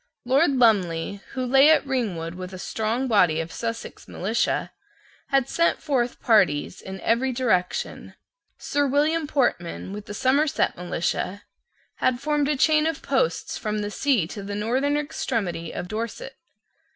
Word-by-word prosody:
Lord 275 +4 +3
Lumley, 200 -6 +2
who 260 -1 -2
lay 270 +4 +6
at 315 - +4
Ringwood 200 -12 -2
with 185 +1 -8
a - - -6
strong 225 +7 -2
body 180 -9 +3
of 165 0 -3
the - - -11
Sussex 230 0 -5
militia, 215 +6 -1 0.6
had 275 -3 +2
sent 335 0 +1
forth 255 -5 -1
parties 185 -8 +2
in 190 0 -8
every 250 +3 +1
direction. 220 -8 -1 0.4
Sir 290 0 0
William 300 +3 +1
Portman, 195 - -1
with 210 0 -8
the 205 - -6
Somerset 280 +6 +2
militia, 180 +2 -3 0.5
had 250 -1 +1
formed 295 0 0
a 300 - +1
chain 310 +2 +4
of 325 -3 -3
posts 260 -12 0
from 215 -1 -2
the 205 0 -3
sea 250 - +1
to 200 +5 -7
the 200 +1 -5
northern 260 +8 0
extremity 200 - -3
of 180 - -5
Dorset. 230 - -5
235 Hz, 150 wpm, -24 LUFS, 190-275 Hz, 0.6 s, lay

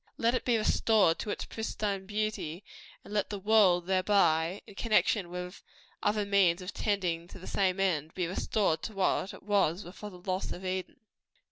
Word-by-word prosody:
Let 230 +1 +2
it 255 - -1
be 240 -2 +3
restored 215 -5 +3
to 215 - -4
its - - -3
pristine 205 -3 -3
beauty; 205 -5 -3 0.4
and - - -9
let 205 -1 0
the 205 - -4
world 195 -4 +4
thereby 185 -2 +2
in - - -13
connection 210 -3 +2
with 180 +1 -6 0.4
other 210 0 +1
means 190 -2 +2
tending 180 -5 -1
to - - -11
the 185 - -11
same 190 -1 0
end 160 -5 0
be 180 - 0
restored 180 -1 0
to 220 - -5
what 195 0 +1
it - - -13
was 200 -3 +1
before 200 +4 -9
the 185 - -12
loss 185 +1 -3
of 185 - -9
Eden. 185 0 -4
195 Hz, 175 wpm, -30 LUFS, 180-210 Hz, 0.4 s, world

